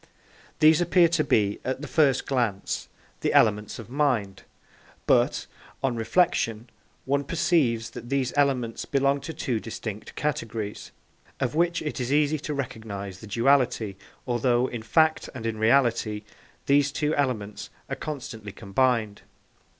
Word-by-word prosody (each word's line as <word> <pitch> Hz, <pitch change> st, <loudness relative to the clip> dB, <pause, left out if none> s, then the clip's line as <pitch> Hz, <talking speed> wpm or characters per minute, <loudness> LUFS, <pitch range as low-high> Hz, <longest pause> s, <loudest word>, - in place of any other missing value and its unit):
These 155 Hz, +2 st, +5 dB
appear 175 Hz, 0 st, +5 dB
to 165 Hz, -2 st, +2 dB
be, 105 Hz, -7 st, +1 dB
at 130 Hz, +1 st, -3 dB
the 150 Hz, -, -5 dB
first 145 Hz, -5 st, +3 dB
glance, 120 Hz, -8 st, -1 dB, 0.3 s
the -, -, 0 dB
elements 105 Hz, -2 st, +3 dB
of 115 Hz, -, -9 dB
mind; 120 Hz, -8 st, 0 dB, 0.6 s
but, -, -, +2 dB, 0.4 s
on 130 Hz, -3 st, +1 dB
reflection, 115 Hz, -3 st, +1 dB, 0.3 s
one 140 Hz, +1 st, +1 dB
perceives 140 Hz, -7 st, +1 dB
that 120 Hz, 0 st, -9 dB
these 135 Hz, -2 st, 0 dB
elements 130 Hz, -5 st, +1 dB
belong 140 Hz, 0 st, +1 dB
to 155 Hz, -, -6 dB
two 125 Hz, -7 st, -2 dB
distinct 110 Hz, -1 st, -7 dB
categories, 115 Hz, -7 st, -3 dB, 0.5 s
of 130 Hz, 0 st, -1 dB
which 170 Hz, +1 st, +1 dB
it 150 Hz, -, -4 dB
is 125 Hz, +1 st, -2 dB
easy 150 Hz, +1 st, +2 dB
to 150 Hz, +1 st, -4 dB
recognise 100 Hz, -8 st, -5 dB
the 110 Hz, -, -10 dB
duality, 115 Hz, -2 st, +2 dB, 0.3 s
although, 120 Hz, 0 st, +2 dB
in 120 Hz, -3 st, -5 dB
fact 155 Hz, +7 st, +2 dB
and 115 Hz, -3 st, -6 dB
in 110 Hz, -1 st, -2 dB
reality, 110 Hz, -3 st, +2 dB, 0.4 s
these 140 Hz, 0 st, +3 dB
two 150 Hz, +2 st, 0 dB
elements 110 Hz, -8 st, -2 dB, 0.2 s
are -, -, -3 dB
constantly 125 Hz, -8 st, -6 dB
combined. 110 Hz, +1 st, 0 dB
125 Hz, 140 wpm, -26 LUFS, 110-145 Hz, 0.6 s, These